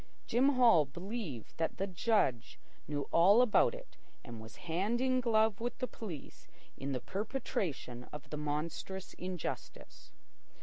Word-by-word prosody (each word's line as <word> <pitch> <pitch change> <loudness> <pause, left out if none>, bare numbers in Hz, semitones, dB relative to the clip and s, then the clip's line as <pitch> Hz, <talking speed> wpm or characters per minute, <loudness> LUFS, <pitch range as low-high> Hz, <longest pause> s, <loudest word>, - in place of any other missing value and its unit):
Jim 255 +4 +4
Hall 230 -11 +6
believed 175 - -6
that 165 -1 -1
the 195 - 0
judge 180 - +1 0.3
knew 145 0 -1
all 195 +7 +7
about 250 - +4
it - - -12 0.3
and 120 -3 -8
was 110 -1 -11
hand 190 +8 0
in 255 0 +2
glove 220 -3 +3
with 240 +1 -3
the 255 - -1
police 190 - -8 0.3
in 140 +1 -4
the 130 - -1
perpetration 185 - -3
of 150 - -10
the 150 - -3
monstrous 155 +6 -3
injustice. 180 -2 -6
190 Hz, 140 wpm, -34 LUFS, 150-230 Hz, 0.3 s, all